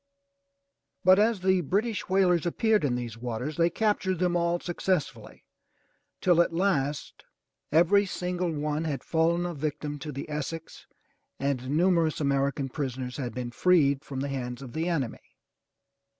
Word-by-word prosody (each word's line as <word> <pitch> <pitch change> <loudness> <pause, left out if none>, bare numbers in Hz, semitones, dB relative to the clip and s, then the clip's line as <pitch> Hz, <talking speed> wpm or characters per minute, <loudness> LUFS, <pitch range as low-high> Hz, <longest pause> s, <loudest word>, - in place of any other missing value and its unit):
But 185 +2 +6
as 215 -2 +2
the 190 -1 +3
British 205 - -1
whalers 180 -3 +3
appeared 220 +3 +2
in 130 -4 +1
these 120 -2 -5
waters, 125 +5 -4
they 170 0 +4
captured 190 -1 0
them 175 0 +1
all 170 0 +1
successively 175 -2 -3 0.8
till 175 -2 +5
at 170 - +1
last 155 -5 -1 0.5
every 175 +6 +4
single 180 -1 -2
one 150 +1 -2
had 145 -4 -3
fallen 170 +2 +1
a 175 - -3
victim 145 0 -4
to 150 +2 -6
the 140 0 -6
Essex 150 +2 -6 0.5
and 135 -2 -1
numerous 165 +1 +2
American 140 -1 0
prisoners 130 -2 -4
had 125 -5 -4
been 125 -1 -4
freed 140 -2 +3
from 135 -2 -5
the 140 - -2
hands 125 -1 -4
of 125 - -9
the 165 +2 -1
enemy. 140 -9 -2
160 Hz, 150 wpm, -27 LUFS, 140-180 Hz, 0.8 s, But